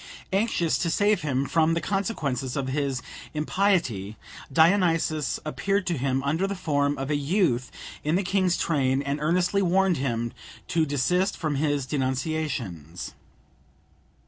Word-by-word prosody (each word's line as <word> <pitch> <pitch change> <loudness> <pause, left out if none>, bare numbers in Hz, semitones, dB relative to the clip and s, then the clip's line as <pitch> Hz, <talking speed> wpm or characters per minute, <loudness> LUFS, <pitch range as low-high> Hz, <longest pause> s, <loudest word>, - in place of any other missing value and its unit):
Anxious 195 -5 +1
to 170 - 0
save 205 +4 +2
him 140 -3 0
from 160 +3 +2
the - - +1
consequences 150 - -2
of 135 -1 -1
his 135 -2 -1 0.3
impiety, 150 - 0 0.3
Dionysus 165 -2 +3
appeared 195 +5 0
to 175 - 0
him 135 0 0
under 160 +7 +1
the 200 - -3
form 145 -5 0
of 135 +2 -3
a - - +2
youth 145 - +1 0.3
in 150 +3 +1
the 195 - +1
king's 185 -2 +1
train, 135 -3 +1
and 140 +1 -2
earnestly 180 +5 +2
warned 190 -1 +3
him 120 -3 -2 0.4
to 160 -2 +2
desist 180 +8 +1
from 155 -3 -1
his 145 -2 0
denunciations. 130 - -3
150 Hz, 140 wpm, -26 LUFS, 135-180 Hz, 0.4 s, Dionysus